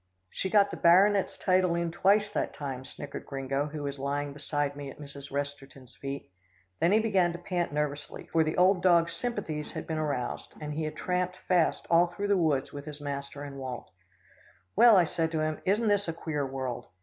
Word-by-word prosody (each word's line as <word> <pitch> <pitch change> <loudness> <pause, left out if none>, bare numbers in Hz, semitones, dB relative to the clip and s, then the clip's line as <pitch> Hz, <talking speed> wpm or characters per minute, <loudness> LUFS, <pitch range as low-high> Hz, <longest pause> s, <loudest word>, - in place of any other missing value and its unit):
"She 190 - -2
got 200 0 +4
the - - -5
baronet's 195 +3 +4
title 185 -2 +2
in 170 -1 -1
twice 205 +4 +3
that - - -1
time," 135 -3 -5
snickered 140 +2 -8
Gringo 135 +1 -2
who 150 0 -6
was 140 -1 -4
lying 140 +1 -2
beside 145 0 -2
me 140 -1 -6
at - - -11
Mrs. 140 -1 -9
Resterton's 140 -2 -5
feet. 140 -6 -6 0.5
Then 170 - +3
he 210 - +6
began 195 -6 +2
to - - -5
pant 175 -1 -2
nervously, 145 0 -3
for 165 -1 +2
the 155 - -2
old 185 0 +5
dog's 170 -2 +4
sympathies 200 -11 -4
had - - -5
been 160 -1 -2
aroused, 145 -5 -3
and 150 -1 -5
he 155 +1 -2
had 155 - -4
tramped 180 0 -1
fast 175 -3 +2
all 170 +1 +6
through 200 +4 -4
the 200 - +5
woods 155 -6 +1
with 145 0 -7
his 150 -1 -7
master 140 0 -5
and 140 -1 -7
Walt. 130 -3 -6 0.8
"Well," 235 -4 +8
I 180 - +6
said 165 -1 -1
to 155 - 0
him, 155 0 -2
"isn't 210 +4 +2
this 205 -2 +2
a 165 - -1
queer 150 -4 -3
world? 130 -2 -4
155 Hz, 205 wpm, -29 LUFS, 140-180 Hz, 0.8 s, Well